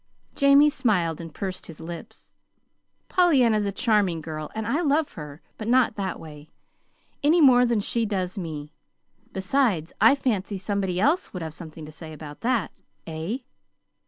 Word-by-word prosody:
Jamie 280 +1 +6
smiled 175 - 0
and 165 -1 -8
pursed 185 +4 -5
his 165 - -11
lips. 165 +1 -9 0.8
"Pollyanna's 250 - +3
a - - -1
charming 200 -5 +1
girl, 155 -1 -6
and 220 -1 -3
I 275 +9 0
love 300 -1 +1
her 150 0 -9 0.2
but 215 - -5
not 250 -1 +4
that 190 -3 -3
way, 150 -1 -11 0.7
any 310 +4 +4
more 250 -5 +6
than 235 -3 +1
she 230 +2 0
does 185 -3 -2
me. 155 -6 -6 0.6
Besides, 190 - 0
I 225 +6 +7
fancy 210 -7 -1
somebody 190 -2 -2
else 295 - +1
would 180 -3 -4
have 160 -1 -6
something 160 -1 -10
to 155 - -10
say 155 0 -10
about 150 -1 -10
that; 235 -5 0 0.3
eh?" 165 +8 -3
195 Hz, 160 wpm, -25 LUFS, 165-245 Hz, 0.8 s, I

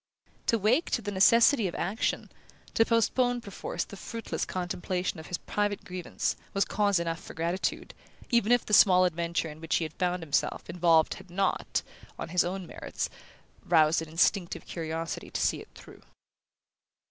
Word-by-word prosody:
To 230 - +3
wake 230 - +2
to 235 - 0
the 205 - -3
necessity 230 +4 +5
of 175 - -5
action, 195 +6 -2 0.4
to 225 - +5
postpone 245 +2 +2
perforce 200 -4 -4
the - - -11
fruitless 225 +4 -4
contemplation 180 0 -3
of 160 - -10
his 175 - -2
private 205 -1 -2
grievance, 180 -4 -3 0.2
was 195 - +3
cause 200 -3 +1
enough 165 -1 -3
for - - -10
gratitude, 170 +3 -2 0.4
even 235 -2 +3
if 245 -1 +4
the 210 - -5
small 185 -3 +7
adventure 170 -1 -1
in 155 +1 -13
which 165 - 0
he 165 - +1
found 180 +2 -2
himself 145 -3 -1
involved 165 -2 +3
had 190 -1 -12
not, 190 +1 0 0.3
on - - -6
its 180 -1 +3
own 185 +1 -4
merits, - - -5 0.5
roused 160 -1 +4
an 160 - -7
instinctive 175 +2 +1
curiosity 165 0 -4
to - - -3
see - - +1
it - - -14
through. - - -14
180 Hz, 165 wpm, -29 LUFS, 170-205 Hz, 0.5 s, small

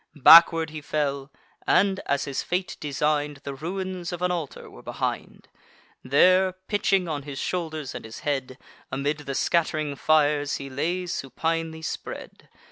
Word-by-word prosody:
Backward 165 +2 +8
he 155 -1 -7
fell; 140 -2 -2 0.4
and, 195 0 +3
as 140 0 0
his 140 -2 -3
fate 180 +1 -2
design'd, 150 0 -1
The 140 - -5
ruins 180 +3 -4
of 175 0 -5
an 180 - +2
altar 165 -6 -5
were - - -13
behind: - - -4 0.6
There, 185 +8 +4
pitching 190 -1 0
on 150 -3 -3
his 140 -1 -8
shoulders 155 -6 -3
and - - -7
his 110 0 -9
head, 135 -3 -2 0.3
Amid 140 +3 -1
the 140 -2 -5
scatt'ring 155 -3 0
fires 145 -1 +2
he 135 -1 -7
lay 175 +7 -1
supinely 160 +2 -3
spread. - - -7
155 Hz, 145 wpm, -25 LUFS, 140-175 Hz, 0.6 s, Backward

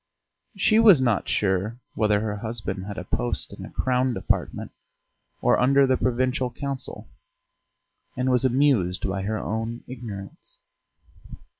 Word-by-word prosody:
She 215 +3 +4
was 210 -9 +8
not 120 -6 +1
sure 100 +3 0 0.2
whether 105 -2 +2
her 105 -1 -2
husband 100 -4 -4
had 100 0 -7
a 90 - -4
post 120 +6 -2
in - - -9
a - - -8
Crown 125 -1 0
Department 95 - -2 0.7
or - - +4
under 135 +2 +5
the 130 -1 +3
Provincial 130 0 0
Council 135 +2 -5 1.1
and 130 +1 +1
was 125 0 +2
amused 125 -10 +2
by 95 0 -2
her 110 +3 -2
own 115 +2 -4
ignorance. 110 -6 -9
120 Hz, 135 wpm, -25 LUFS, 105-130 Hz, 1.1 s, was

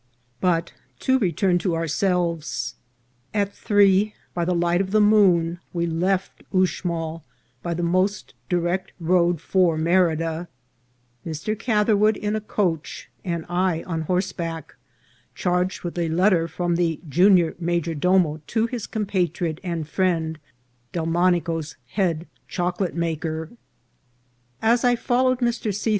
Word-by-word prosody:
BUT 170 -2 +1 0.3
to 260 0 +3
return 180 -2 +2
to 175 -2 0
ourselves. 165 - -1 0.6
At 200 -1 0
three, 205 -1 +3 0.2
by 170 -1 -1
the 180 +1 +1
light 175 +1 +2
of 190 - -2
the 215 +2 +3
moon, 185 -5 +4
we 170 -1 0
left 180 +3 -1
Uxmal 170 -3 -1 0.4
by 170 -1 -2
the 175 - -2
most 185 +4 0 0.2
direct 175 +1 -1
road 175 0 +2
for 180 -3 +2
Me 160 +2 0
rida, 165 -2 +1 0.8
Mr. 160 +6 -3
Catherwood 215 -2 +3
in 210 +1 -2
a 215 - -2
coach 180 -7 -2
and 170 -3 -3
I 175 -1 0
on 165 -3 -3
horseback, 170 -1 -3 0.6
charged 180 +1 0
with 175 0 -4
a 170 -1 0
letter 175 0 +3
from 175 +1 -1
the 165 -3 0
junior 175 +2 +4
major 170 -1 -1
domo 165 -1 +2
to 225 -1 +1
his 235 -2 -4
compatriot 180 -6 -1
and 170 -4 -3
friend, 160 -2 0 0.5
Delmonico's 165 -2 0
head 170 - 0 0.2
chocolate 180 0 -2
ma 170 -1 0
ker. 160 0 -4 1.1
As 230 +2 +3
I 245 -1 +4
followed 255 +1 +1
Mr. 235 -3 0
C. 205 +3 -2
175 Hz, 130 wpm, -23 LUFS, 165-195 Hz, 1.1 s, moon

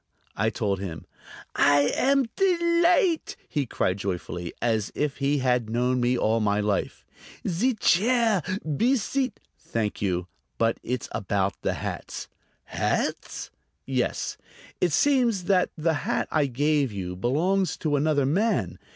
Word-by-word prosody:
I 105 +2 +1
told 105 -3 -1
him. 85 -4 -6 0.5
"I 145 0 +4
am 275 0 +3
delight'!" 340 -2 +2
he 145 -3 -2
cried 95 -3 0
joyfully, 90 -2 -4
as 110 -3 0
if 145 -1 -1
he 140 +1 +1
had 125 -4 +1
known 125 +2 +1
me 125 +1 +2
all 115 0 +2
my 105 -1 +1
life. 105 -1 -1 0.4
"Zee 225 +9 +1
chair; 220 +1 +3 0.4
be 250 +4 +3
seat'...." 255 +1 -1 0.2
"Thank 110 -2 -3
you, 90 -3 0 0.3
but 115 0 +1
it's 125 -1 -3
about 100 -1 0
the - - 0
hats." - - -5 0.4
"Hats?" - - -2 0.3
"Yes. 130 -2 -1 0.4
It 175 - +2
seems 235 - +3
that 185 -1 +2
the 160 +1 +1
hat - - -1
I 150 -3 +2
gave 145 +1 +1
you 90 -3 -5
belongs 165 - +1
to 150 -2 0
another 145 -1 +2
man. 200 +12 0
140 Hz, 135 wpm, -26 LUFS, -, 0.5 s, I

